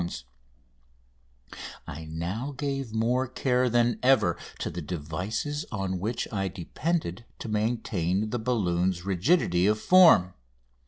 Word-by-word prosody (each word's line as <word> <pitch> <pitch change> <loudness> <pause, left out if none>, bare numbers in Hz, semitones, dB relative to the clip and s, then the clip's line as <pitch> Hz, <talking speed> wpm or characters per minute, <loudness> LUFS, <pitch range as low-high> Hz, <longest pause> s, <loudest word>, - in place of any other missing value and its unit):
FIRST 85 -6 -5 1.3
TRIP] - - -11 0.3
I 80 +3 -7
now 90 - -4
gave 135 -3 -3
more 120 +4 +1
care 125 0 +1
than 120 0 +2
ever 125 -10 +4 0.2
to - - -3
the 90 - -5
devices 90 - -3
on 95 -4 -2
which 110 +6 -2
I 95 -2 0
depended 95 - -3
to - - -7
maintain 105 -3 -1
the 120 - -1
balloon's 95 -6 0
rigidity 95 - +2
of 105 0 +2
form. 165 - +6
105 Hz, 125 wpm, -27 LUFS, 90-125 Hz, 1.3 s, form